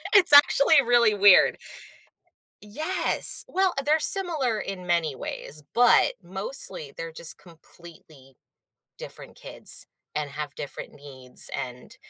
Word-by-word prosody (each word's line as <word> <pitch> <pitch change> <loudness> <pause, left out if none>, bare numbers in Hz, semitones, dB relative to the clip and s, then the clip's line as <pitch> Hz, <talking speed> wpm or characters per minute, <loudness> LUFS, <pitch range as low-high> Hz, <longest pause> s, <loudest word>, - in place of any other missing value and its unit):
It's 370 -6 +6
actually 285 +1 +4
really 235 -3 +1
weird. 200 -1 +3 1.1
Yes! 310 - +3
Well, 380 -1 -2
they're 310 +2 +1
similar 305 - +1
in 185 -2 -9
many 165 -4 -2
ways, 150 +3 -4
but 245 0 +2
mostly 190 - -3
they're 165 0 -8
just 160 0 -3
completely 160 -5 -19 0.6
different - - -11
kids, - - 0 0.3
and 150 -2 -5
have 145 -1 -9
different 140 - -10
needs 130 -3 0
and, 125 0 -9
180 Hz, 115 wpm, -23 LUFS, -, 1.1 s, It's